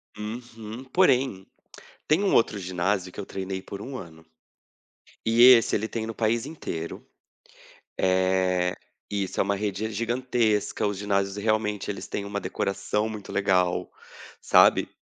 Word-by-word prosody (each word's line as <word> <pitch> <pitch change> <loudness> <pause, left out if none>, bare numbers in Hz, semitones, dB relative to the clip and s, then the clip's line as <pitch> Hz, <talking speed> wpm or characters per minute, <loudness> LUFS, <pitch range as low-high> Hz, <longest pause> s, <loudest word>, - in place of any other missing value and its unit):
Uhum. 110 +1 -7
Porém, 130 - +2 0.6
tem 160 +6 +3
um 200 - +2
outro 110 -2 +3
ginásio 90 0 -1
que - - -16
eu 100 - -6
treinei 95 0 -5
por 100 - -8
1 130 +5 -6
ano 80 -7 -11 1.0
e 115 +1 +4
esse 125 -2 +7
ele 110 +2 -2
tem 110 -1 -4
no 115 - -5
país 115 +2 0
inteiro. 85 - -6 0.9
Eh 95 -1 +2 0.4
isso, 100 -2 -2
é - - +5
uma 100 +1 0
rede 105 +1 -2
gigantesca, 115 -2 0
os 100 -1 -1
ginásios 100 0 -1
realmente 105 -1 -1
eles 100 - -5
têm 100 - -3
uma 100 0 -4
decoração 105 +3 -2
muito 105 -2 -8
legal, 95 -3 +1 0.5
sabe, - - +5
105 Hz, 140 wpm, -26 LUFS, 95-115 Hz, 1.0 s, esse